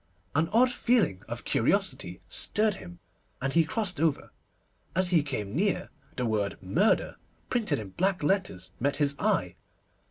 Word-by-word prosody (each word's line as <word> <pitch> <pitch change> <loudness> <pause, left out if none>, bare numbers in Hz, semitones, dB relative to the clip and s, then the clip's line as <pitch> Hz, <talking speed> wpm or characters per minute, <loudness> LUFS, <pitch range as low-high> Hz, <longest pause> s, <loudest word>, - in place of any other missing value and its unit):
An 160 +3 +2
odd 245 +4 +5
feeling 230 - +2
of - - -6
curiosity 90 +1 0
stirred 210 - +1
him, 85 - -10 0.4
and 135 +1 -2
he 165 - +5
crossed 190 -2 -1
over. 160 -2 0 0.6
As 185 0 +4
he 170 -3 +5
came 125 -7 -4
near, 195 +4 0 0.2
the 125 - -1
word 105 -3 -1
'Murder,' 165 - +1 0.3
printed 230 -4 +1
in 105 -3 -6
black 185 - 0
letters, 190 - 0
met 140 +2 +1
his 145 -1 +1
eye. - - 0
160 Hz, 150 wpm, -28 LUFS, -, 0.6 s, odd